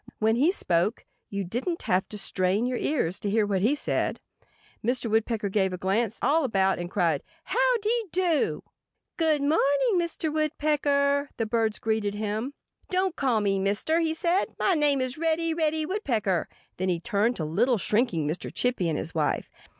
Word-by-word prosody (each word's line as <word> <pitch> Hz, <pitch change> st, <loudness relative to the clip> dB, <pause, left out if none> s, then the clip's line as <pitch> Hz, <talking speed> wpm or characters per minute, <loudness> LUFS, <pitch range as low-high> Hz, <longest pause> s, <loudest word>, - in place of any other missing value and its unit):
When 220 Hz, +1 st, +2 dB
he 300 Hz, +8 st, +4 dB
spoke 185 Hz, -, 0 dB, 0.2 s
you 200 Hz, -1 st, -3 dB
didn't 250 Hz, -, -3 dB
have 185 Hz, +1 st, +1 dB
to 210 Hz, -, -6 dB
strain 195 Hz, +2 st, 0 dB
your 250 Hz, -1 st, -1 dB
ears 195 Hz, -, -1 dB
to 205 Hz, -, -2 dB
hear 215 Hz, +1 st, +2 dB
what 195 Hz, -2 st, 0 dB
he 240 Hz, +9 st, +3 dB
said. 295 Hz, -, -1 dB, 0.6 s
Mr. 240 Hz, -1 st, -1 dB
Woodpecker 220 Hz, -1 st, +1 dB
gave 190 Hz, -2 st, +1 dB
a -, -, -3 dB
quick -, -, -25 dB
glance 215 Hz, +4 st, 0 dB
all 315 Hz, +3 st, +3 dB
about 195 Hz, -7 st, +1 dB
and 175 Hz, 0 st, -4 dB
cried, 165 Hz, -5 st, +1 dB, 0.2 s
"How -, -, +2 dB
dy 460 Hz, +2 st, +1 dB
do!" 350 Hz, -4 st, +1 dB, 0.5 s
"Good 315 Hz, -3 st, +2 dB
morning, 295 Hz, +3 st, +2 dB, 0.4 s
Mr. 335 Hz, -2 st, -2 dB
Woodpecker!" 290 Hz, -2 st, +1 dB
the 225 Hz, -, 0 dB
birds 220 Hz, -1 st, 0 dB
greeted 220 Hz, -2 st, -1 dB
him. 215 Hz, +6 st, -3 dB, 0.3 s
"Don't 375 Hz, -1 st, 0 dB
call 250 Hz, -6 st, +1 dB
me 195 Hz, -1 st, +1 dB
'Mister!'" 205 Hz, +12 st, +1 dB
he 320 Hz, -1 st, 0 dB
said. 345 Hz, +3 st, +1 dB
"My 385 Hz, -, +2 dB
name 295 Hz, -4 st, +2 dB
is 255 Hz, +3 st, -3 dB
Reddy—Reddy 320 Hz, -1 st, 0 dB
Woodpecker." 230 Hz, -, -1 dB, 0.3 s
Then 185 Hz, +1 st, -1 dB
he 175 Hz, -2 st, 0 dB
turned 230 Hz, +4 st, +1 dB
to 160 Hz, -, -3 dB
little, 225 Hz, +11 st, +2 dB
shrinking 205 Hz, -, 0 dB
Mr. 155 Hz, +4 st, -4 dB
Chippy 245 Hz, -9 st, 0 dB
and 155 Hz, -, -1 dB
his 160 Hz, -, -3 dB
wife. 155 Hz, -2 st, -1 dB
235 Hz, 175 wpm, -27 LUFS, 200-305 Hz, 0.6 s, he